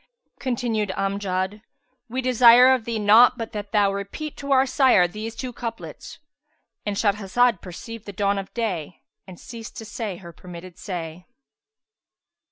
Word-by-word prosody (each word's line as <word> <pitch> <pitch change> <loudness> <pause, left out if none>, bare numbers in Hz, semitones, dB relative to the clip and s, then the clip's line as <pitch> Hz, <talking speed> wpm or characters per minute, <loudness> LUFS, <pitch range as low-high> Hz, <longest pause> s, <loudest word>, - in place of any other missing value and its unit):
'" - - -45
Continued 230 -4 -1
Amjad, 195 0 -2 0.5
"We 255 +3 -3
desire 250 +1 +7
of 250 -4 -1
thee 230 -1 -2
naught 220 +4 +6
but 230 -2 -5
that 205 -1 -6
thou 205 -2 +3
repeat 200 +10 -6
to 280 0 -6
our 265 0 +5
sire 255 -9 +4
these 215 +5 -7
two 250 +1 -5
couplets."—And 230 -2 -9
Shahrazad 205 +1 +1
perceived 225 +5 -9
the - - -5
dawn 200 +1 0
of 195 - -8
day 185 - -3 0.2
and 185 -2 -11
ceased 230 -2 -10
to 225 - -7
say 210 -4 -5
her 170 -2 -12
permitted 180 +1 -11
say. 175 -3 -6
210 Hz, 150 wpm, -23 LUFS, 195-235 Hz, 0.5 s, desire